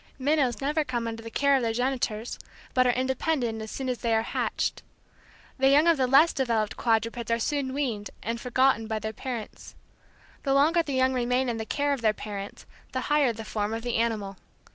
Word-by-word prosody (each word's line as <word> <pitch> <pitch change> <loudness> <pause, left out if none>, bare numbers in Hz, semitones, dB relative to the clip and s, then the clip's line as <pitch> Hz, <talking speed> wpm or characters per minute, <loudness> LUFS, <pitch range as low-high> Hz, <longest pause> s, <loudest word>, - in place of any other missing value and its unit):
Minnows 275 -3 +1
never 300 +3 +1
come 240 -4 -3
under 225 0 -5
the 230 - -8
care 280 +4 +3
of 265 - +2
their 230 -1 0
genitors, 245 -2 -2 0.3
but 255 0 +4
are - - +5
independent 255 -2 -1
as 220 - -6
soon 265 +3 -4
as 250 -2 -2
they 230 -1 +1
are 220 - +2
hatched. - - -2 0.8
The 270 0 +5
young 290 +3 +5
of 335 -2 +4
the 260 -1 +2
less 285 +6 +6
developed 230 -5 0
quadrupeds 230 0 0
are 230 - +2
soon 270 +3 -1
weaned 245 -7 -2
and 230 +1 -3
forgotten 250 -2 +2
by 220 -1 -2
their 220 0 -4
parents. 240 -3 -7 0.7
The 275 -1 +1
longer 320 +5 +4
the 290 -4 -4
young 260 0 +3
remain 250 +1 +1
in 235 - -2
the 220 0 -5
care 285 0 0
of 275 - -4
their 215 -2 +3
parents 200 -1 -7 0.3
the 260 - -1
higher 290 -4 +4
the 225 -1 -8
form 210 0 -2
of 225 - -5
the 240 -2 -1
animal. 215 -4 -1
245 Hz, 210 wpm, -27 LUFS, 225-270 Hz, 0.8 s, less